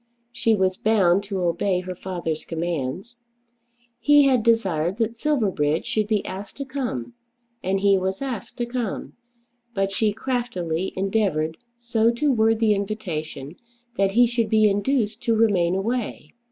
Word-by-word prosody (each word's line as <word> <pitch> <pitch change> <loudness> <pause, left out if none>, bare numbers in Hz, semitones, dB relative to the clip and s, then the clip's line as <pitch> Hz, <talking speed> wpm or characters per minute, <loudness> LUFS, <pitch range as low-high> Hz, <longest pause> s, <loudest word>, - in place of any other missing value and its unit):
She 225 -2 +2
was 190 -2 +1
bound 200 -4 +3
to 195 -2 -3
obey 180 +2 +1
her 185 0 -5
father's 175 -4 -4
commands. 170 - -4 0.8
He 290 0 +6
had 260 -4 +4
desired 190 -6 +1
that 230 0 -1
Silverbridge 200 - 0
should 215 -1 0
be 210 -2 0
asked 195 +2 -7
to 275 - -4
come, 255 - -4 0.5
and 190 +1 0
he 200 -1 +4
was 190 +1 -2
asked 255 -7 -5
to 240 - -1
come. 240 -4 -4 0.6
But 195 0 0
she 210 +2 +1
craftily 200 -8 -2
endeavoured 190 -6 0 0.2
so 235 -1 +1
to 285 +5 +1
word 225 -2 +3
the 220 -2 +4
invitation 175 -8 -4 0.4
that 195 -2 +1
he 245 +3 +6
should 235 -2 0
be 215 -1 +5
induced 215 +2 0
to 230 - +3
remain 190 -6 +3
away. 230 +5 -3
205 Hz, 150 wpm, -23 LUFS, 185-230 Hz, 0.8 s, He